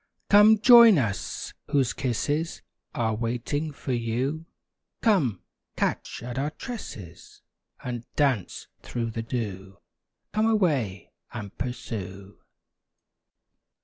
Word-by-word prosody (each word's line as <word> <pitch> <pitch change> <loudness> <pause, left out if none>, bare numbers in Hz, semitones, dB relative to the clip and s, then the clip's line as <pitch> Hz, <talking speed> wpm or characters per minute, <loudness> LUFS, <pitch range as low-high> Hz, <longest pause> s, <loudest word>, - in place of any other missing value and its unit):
Come 210 +2 +8
join 235 -2 +8
us, 100 - -3 0.2
whose 135 -4 +2
kisses 145 +6 -2 0.3
Are 115 -5 0
waiting 120 +7 -2
for 135 -2 -4
you; 125 +7 -2 0.6
Come, 150 - +2 0.3
catch - - -2
at 125 +2 -4
our 145 +2 0
tresses, 110 - -9 0.4
And 120 -2 -4
dance 135 - 0
through 115 -2 -3
the 115 - -4
dew! 100 -5 -5 0.6
Come 215 +1 +2
away, 145 - 0 0.2
and 105 -4 -7
pursue! 100 -5 -6
125 Hz, 100 wpm, -26 LUFS, 110-155 Hz, 0.6 s, Come